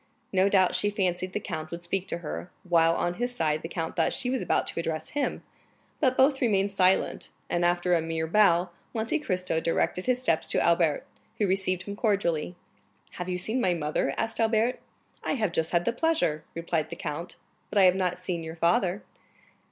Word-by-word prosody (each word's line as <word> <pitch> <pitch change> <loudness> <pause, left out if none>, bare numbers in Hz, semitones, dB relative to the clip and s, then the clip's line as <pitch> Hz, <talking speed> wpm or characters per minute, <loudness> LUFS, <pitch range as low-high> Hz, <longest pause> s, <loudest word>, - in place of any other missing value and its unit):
No 190 +1 +4
doubt 185 -2 +4
she 185 +3 +2
fancied 185 -2 -1
the - - -1
count 160 -6 -5
would 170 0 -7
speak 185 +2 -1
to 170 - -3
her, 175 - -5 0.2
while 165 -1 +4
on 175 - 0
his 245 0 -1
side 155 -4 0
the - - -5
count 165 -1 -4
thought 165 - +2
she 250 -1 -1
was 260 - 0
about - - +1
to - - -4
address 160 -1 -3
him; 290 - -2 0.6
but 260 -3 +2
both 265 +1 +4
remained 200 -4 +2
silent, 190 -1 +2 0.2
and 175 - +1
after 175 +1 +2
a 170 - +3
mere 160 0 -2
bow, 175 -1 +3 0.2
Monte 225 +8 0
Cristo 185 - -1
directed 170 +3 -1
his 250 -1 +2
steps 165 -11 0
to - - +1
Albert, 170 -3 +2 0.3
who 210 - +2
received 185 -1 0
him 200 - -6
cordially. 185 -7 0 0.6
"Have 180 0 -6
you 180 - -1
seen 220 +8 -1
my 180 -4 +2
mother?" 150 -3 -1
asked 225 - -1
Albert. 225 +2 +2 0.4
"I - - 0
have 215 -9 0
just 160 -1 0
had 175 0 +1
the 235 - +1
pleasure," 275 - +1
replied 165 -2 -1
the - - -6
count; 170 +4 -5 0.3
"but - - -3
I 195 - +7
have 180 -1 +7
not 185 -2 0
seen 180 -2 -3
your 160 0 -6
father." 175 +4 +1
180 Hz, 200 wpm, -27 LUFS, 170-205 Hz, 0.6 s, I